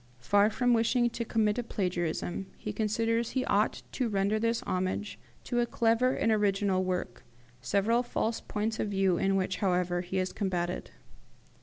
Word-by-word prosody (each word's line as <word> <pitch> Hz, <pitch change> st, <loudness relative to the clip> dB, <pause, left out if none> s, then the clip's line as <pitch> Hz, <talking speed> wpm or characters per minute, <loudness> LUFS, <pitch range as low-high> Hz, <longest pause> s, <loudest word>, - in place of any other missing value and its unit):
Far 205 Hz, -, +3 dB
from 245 Hz, +2 st, +2 dB
wishing 240 Hz, +1 st, +2 dB
to 235 Hz, -, -3 dB
commit 220 Hz, -1 st, +1 dB
a -, -, -1 dB
plagiarism, 180 Hz, -2 st, -2 dB
he 210 Hz, -, -5 dB
considers 230 Hz, +2 st, 0 dB
he 260 Hz, -, -1 dB
ought 205 Hz, +2 st, +1 dB
to 250 Hz, -3 st, -1 dB
render 200 Hz, +1 st, +1 dB
this 230 Hz, +1 st, 0 dB
homage 185 Hz, +3 st, -2 dB, 0.2 s
to 240 Hz, -, -1 dB
a 240 Hz, -, +2 dB
clever 235 Hz, +2 st, +2 dB
and 225 Hz, -, +1 dB
original 200 Hz, -3 st, +2 dB
work, 180 Hz, -10 st, -3 dB, 0.4 s
several 210 Hz, -, +2 dB
false 230 Hz, -2 st, -2 dB
points 220 Hz, +1 st, -3 dB
of -, -, 0 dB
view 195 Hz, -3 st, +2 dB
in 195 Hz, 0 st, +2 dB
which, 185 Hz, -1 st, 0 dB
however, 180 Hz, -2 st, +1 dB
he 185 Hz, +1 st, -4 dB
has 185 Hz, 0 st, -1 dB
combated. 180 Hz, -3 st, -2 dB
205 Hz, 165 wpm, -30 LUFS, 185-230 Hz, 0.4 s, Far